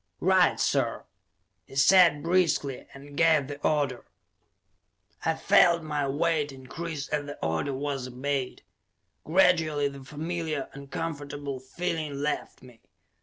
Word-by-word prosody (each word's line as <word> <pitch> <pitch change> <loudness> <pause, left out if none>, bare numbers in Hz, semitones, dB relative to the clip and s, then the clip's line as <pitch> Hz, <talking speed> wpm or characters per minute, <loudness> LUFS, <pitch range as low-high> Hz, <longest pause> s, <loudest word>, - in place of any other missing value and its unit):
"Right, - - +3
sir!" - - 0 0.6
he - - -14
said 150 +1 +5
briskly, 165 -6 +1
and 140 +1 -12
gave 160 -3 +4
the 145 +1 -7
order. 145 -6 0 1.2
I 160 - +1
felt 170 -3 +4
my 150 -2 -1
weight 150 +1 0
increase 140 +3 -6
as 145 -1 -2
the 145 - -7
order 80 - -1
was 135 -2 -3
obeyed; 130 +1 -3 0.6
gradually 160 -4 +3
the 140 -1 -8
familiar, 155 0 -4
uncomfortable 145 -1 -5
feeling 155 +2 -3
left 150 -3 -3
me. 125 -3 -16
145 Hz, 120 wpm, -27 LUFS, 140-165 Hz, 1.2 s, said